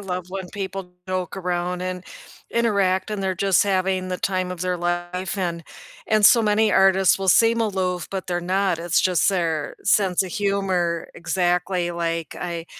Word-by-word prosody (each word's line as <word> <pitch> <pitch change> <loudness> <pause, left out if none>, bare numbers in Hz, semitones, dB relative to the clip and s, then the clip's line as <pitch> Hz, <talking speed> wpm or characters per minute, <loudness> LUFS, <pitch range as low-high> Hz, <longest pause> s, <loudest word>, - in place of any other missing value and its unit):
love 185 -2 -4
when 190 -1 -6
people 195 -2 -6 0.2
joke 185 0 -3
around, 180 -1 -2
and 185 0 -4 0.5
interact, 200 -4 +1
and 205 -2 -3
they're 190 -1 0
just 195 0 +3
having 190 -1 0
the 180 - -2
time 185 -1 -1
of 180 - -9
their 180 0 -1
life 175 +2 -3
and 170 -3 -3 0.4
and, 215 -1 +2
so 230 +3 +7
many 210 +1 +2
artists 190 0 +4
will 195 - -3
seem 230 +4 +4
aloof, 190 -5 -1
but 190 -1 -4
they're 175 -1 -1
not, 185 0 0
it's 170 -1 +1
just 185 0 +2
their 165 -5 -1
sense 190 -2 +2
of 185 - -7
humor 190 -4 -1
exactly 180 0 0
like 165 -2 -3
I 170 -1 -5
185 Hz, 170 wpm, -23 LUFS, 175-195 Hz, 0.5 s, so